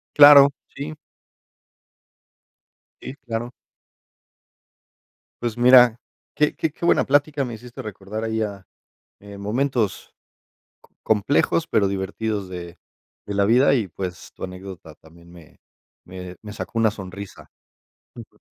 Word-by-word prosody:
Claro, 145 Hz, -1 st, +9 dB, 0.3 s
sí. 150 Hz, +3 st, -6 dB, 2.1 s
Y, 130 Hz, -, -8 dB
claro. 120 Hz, -2 st, -5 dB, 1.9 s
Pues 120 Hz, -1 st, -3 dB
mira, 125 Hz, -1 st, +7 dB, 0.4 s
qué 150 Hz, 0 st, +1 dB
qué 160 Hz, -, -1 dB
qué 170 Hz, -, -6 dB
buena -, -, +4 dB
plática 145 Hz, 0 st, +1 dB
me 120 Hz, -, -6 dB
hiciste 120 Hz, +2 st, -10 dB
recordar 105 Hz, +1 st, -7 dB
ahí 110 Hz, 0 st, -2 dB
a, 100 Hz, -3 st, -5 dB, 0.6 s
eh, 100 Hz, 0 st, -11 dB
momentos 115 Hz, 0 st, -2 dB, 0.7 s
co -, -, -26 dB
complejos, 125 Hz, +9 st, +1 dB
pero 100 Hz, -2 st, +2 dB
divertidos 100 Hz, +1 st, -3 dB
de, 85 Hz, -1 st, -8 dB, 0.5 s
de 100 Hz, -, -4 dB
la 100 Hz, 0 st, +2 dB
vida 125 Hz, +6 st, +4 dB
y, 110 Hz, -7 st, -1 dB
pues, 90 Hz, 0 st, -7 dB
tu -, -, -11 dB
anécdota 90 Hz, -3 st, -9 dB
también 85 Hz, +2 st, -19 dB
me, 85 Hz, -3 st, -17 dB, 0.5 s
me, 90 Hz, 0 st, -9 dB
me 105 Hz, -, -9 dB
sacó 115 Hz, -, -6 dB
una 110 Hz, -2 st, +3 dB
sonrisa 100 Hz, -1 st, -10 dB, 0.7 s
Súper. -, -, -13 dB
110 Hz, 125 wpm, -22 LUFS, 95-125 Hz, 2.1 s, Claro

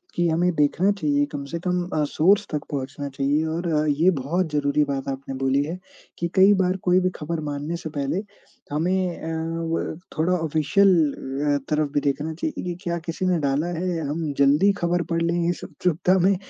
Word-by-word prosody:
कि 175 Hz, 0 st, +2 dB
हमें 175 Hz, +3 st, +2 dB
देखना 160 Hz, +7 st, +3 dB
चाहिए, 150 Hz, -7 st, +1 dB
कम 145 Hz, -1 st, -4 dB
से 170 Hz, -, -3 dB
कम 180 Hz, -1 st, +1 dB
अ, 155 Hz, -, +1 dB
सोर्स 195 Hz, +7 st, +3 dB
तक 150 Hz, -2 st, -2 dB
पहुँचना 140 Hz, 0 st, -4 dB
चाहिए। 140 Hz, +3 st, 0 dB
और 170 Hz, +2 st, -2 dB, 0.2 s
ये 155 Hz, +5 st, +3 dB
बहुत 160 Hz, +3 st, -1 dB
ज़रूरी 145 Hz, 0 st, +2 dB
बात 140 Hz, -1 st, -3 dB
आपने 135 Hz, 0 st, -5 dB
बोली 135 Hz, +1 st, +2 dB
है, 165 Hz, +5 st, -4 dB, 0.4 s
कि 170 Hz, -, 0 dB
कई 195 Hz, +1 st, +7 dB
बार 185 Hz, 0 st, +1 dB
कोई 180 Hz, 0 st, +4 dB
भी 185 Hz, 0 st, +1 dB
ख़बर 160 Hz, +2 st, -3 dB
मानने 145 Hz, +3 st, -3 dB
से 160 Hz, -, -6 dB
पहले 140 Hz, +7 st, -1 dB, 0.5 s
हमें 180 Hz, +3 st, 0 dB
अ, 165 Hz, +1 st, -3 dB
व 165 Hz, -, -2 dB, 0.2 s
थोड़ा 165 Hz, +4 st, +2 dB
ऑफ़िशियल 160 Hz, +4 st, +3 dB, 0.7 s
अ, -, -, +2 dB
तरफ 150 Hz, -1 st, +1 dB
भी -, -, +3 dB
देखना 145 Hz, +3 st, -1 dB
चाहिए 300 Hz, -, -4 dB
कि, 175 Hz, -1 st, -3 dB
क्या 170 Hz, -2 st, -1 dB
किसी 175 Hz, +3 st, -3 dB
ने 180 Hz, -2 st, +2 dB
डाला 145 Hz, +2 st, 0 dB
है 180 Hz, +3 st, -2 dB
या 165 Hz, -, -3 dB
हम 155 Hz, 0 st, -2 dB
जल्दी 145 Hz, +8 st, +5 dB
ख़बर 175 Hz, 0 st, +1 dB
पढ़ 165 Hz, -, +1 dB
लें 170 Hz, 0 st, +1 dB
इस 175 Hz, -, -3 dB
उत्सुकता 180 Hz, +2 st, +1 dB
में, 190 Hz, +2 st, +4 dB
160 Hz, 195 wpm, -24 LUFS, 145-180 Hz, 0.7 s, कई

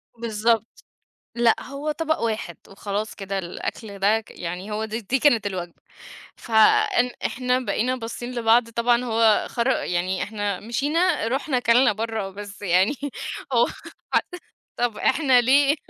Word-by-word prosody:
بالضبط، 225 Hz, 0 st, -1 dB, 0.5 s
لأ 235 Hz, -1 st, +4 dB
هو 285 Hz, +3 st, -4 dB
طبق 315 Hz, +1 st, -1 dB
واحد 220 Hz, -6 st, -3 dB
وخلاص 205 Hz, +2 st, -4 dB
كده 195 Hz, -1 st, -4 dB
الأكل 200 Hz, +3 st, -6 dB
ده 215 Hz, +3 st, +2 dB
يعني 180 Hz, +4 st, -6 dB
هو 215 Hz, +1 st, -2 dB
د 220 Hz, 0 st, -6 dB
دي 235 Hz, +4 st, -1 dB
كانت 235 Hz, -9 st, +3 dB
الوجبة، 175 Hz, -3 st, -5 dB, 0.6 s
ف -, -, -13 dB, 0.5 s
إن 250 Hz, +1 st, +3 dB, 0.2 s
إحنا 250 Hz, 0 st, 0 dB
بقينا 250 Hz, +2 st, -1 dB
باصين 240 Hz, +1 st, -6 dB
لبعض 230 Hz, 0 st, +3 dB
طبعًا 235 Hz, +1 st, +1 dB
هو 225 Hz, -2 st, +3 dB
خر 235 Hz, +1 st, -1 dB
يعني 180 Hz, -5 st, -1 dB
إحنا 205 Hz, -2 st, -3 dB
مشينا 295 Hz, -, 0 dB
رُحنا 270 Hz, +2 st, -1 dB
أكلنا 245 Hz, 0 st, +4 dB
بره 220 Hz, -2 st, -3 dB
بس 205 Hz, +1 st, -10 dB
يعني 185 Hz, +4 st, +3 dB, 0.6 s
هو -, -, +4 dB
خر -, -, -10 dB, 0.9 s
طب 240 Hz, -3 st, -1 dB
إحنا 265 Hz, -5 st, +3 dB
ليه؟ 275 Hz, +4 st, +4 dB
225 Hz, 140 wpm, -23 LUFS, 205-250 Hz, 0.9 s, لأ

